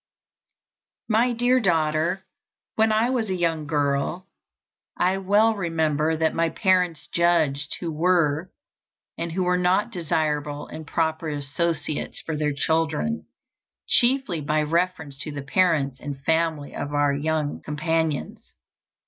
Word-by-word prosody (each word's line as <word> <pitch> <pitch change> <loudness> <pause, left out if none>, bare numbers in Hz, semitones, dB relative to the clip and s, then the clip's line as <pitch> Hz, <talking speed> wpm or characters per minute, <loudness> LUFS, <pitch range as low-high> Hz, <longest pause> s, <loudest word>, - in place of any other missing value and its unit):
My 230 +3 +3
Dear 245 +2 +3
Daughter: 170 -1 +1 0.5
When 220 0 +3
I 220 +3 +2
was 230 -5 -1
a 190 - 0
young 165 -4 -1
girl, 145 +4 0 0.7
I 185 +2 +2
well 205 +4 +3
remember 160 -4 0
that 160 0 +1
my 165 0 +1
parents 180 -4 +1
judged 160 -5 +2
who 170 -2 -3
were 165 0 +1 0.6
and 165 0 -4
who 185 +1 0
were 180 0 +2
not 185 +5 +2
desirable 150 -5 -1
and 155 -1 -9
proper 160 0 -1
associates 150 +1 -2
for 160 - -4
their 150 0 0
children, 160 +8 -1 0.6
chiefly 245 - +2
by 150 +1 +1
reference 160 -3 -1
to 155 - -3
the 145 -1 -6
parents 140 -4 +1
and 140 -2 -6
family 160 -2 0
of 145 +1 -4
our 145 -1 +3
young 150 +1 -1
companions. 160 0 -2
160 Hz, 130 wpm, -24 LUFS, 150-185 Hz, 0.7 s, My